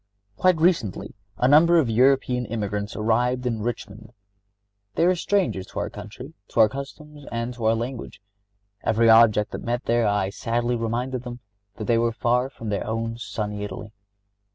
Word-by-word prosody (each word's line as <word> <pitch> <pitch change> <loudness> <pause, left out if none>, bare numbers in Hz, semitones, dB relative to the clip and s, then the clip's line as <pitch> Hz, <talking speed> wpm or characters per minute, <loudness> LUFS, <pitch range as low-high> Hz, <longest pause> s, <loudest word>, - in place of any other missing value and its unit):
Quite 185 - +3
recently 160 - 0 0.2
a 125 - +2
number 165 +5 +6
of 155 -6 +3
European 125 +1 +2
emigrants 105 -2 -3
arrived 120 +3 0
in 115 -3 -1
Richmond. 110 -1 -6 0.8
They 165 - +3
were 180 - +4
strangers 175 - -1
to - - -6
our - - -3
country, - - -10
to - - -3
our 110 - +7
customs 145 +3 -9
and 115 +1 -3
to 120 -2 -6
our 110 +1 +4
language. 120 +1 -5 0.6
Every 115 +1 +4
object 110 -2 +5
that - - -6
met 120 +1 -2
their 115 -1 +2
eye 100 -2 0
sadly 120 +3 -1
reminded 120 +2 -2
them 125 -1 -8 0.4
that 110 - -6
they 115 0 +2
were 115 0 +1
far 125 +2 +1
from 115 -5 -8
their 100 0 -2
own 115 +1 -3
sunny 105 -3 -4
Italy. 105 +1 -7
115 Hz, 170 wpm, -24 LUFS, 110-125 Hz, 0.8 s, our